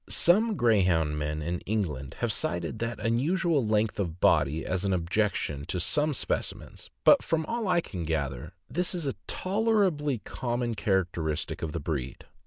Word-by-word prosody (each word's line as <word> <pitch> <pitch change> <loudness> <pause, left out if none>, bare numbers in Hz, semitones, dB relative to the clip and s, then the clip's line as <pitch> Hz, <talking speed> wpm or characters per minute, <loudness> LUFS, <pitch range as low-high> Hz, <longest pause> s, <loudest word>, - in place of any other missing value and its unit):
Some 215 +6 +4
Greyhound 90 - +2
men 75 +1 -2
in 85 +3 -2
England 80 -11 -3
have - - +1
cited 85 +5 -2
the 115 -1 -2
unusual 145 - +1
length 105 -1 +1
of 90 -3 -2
body 75 -1 +3
as 95 0 -1
an 100 -1 +1
objec 95 +4 +1
tion 70 -1 -3
to 90 - -2
some 150 - +2
specimens, - - -4
but - - +7
from 160 -1 -1
all 230 +3 -2
I 175 -2 +3
can 90 - -6
gather, 70 -6 -3
this 180 +2 -1
is 170 -4 -3
a 135 - 0
tolerably 190 - +1
common 120 +1 -3
characteristic 85 -7 -1
of 80 - -3
the 85 - -3
breed. 70 -4 -4
105 Hz, 165 wpm, -28 LUFS, -, -, but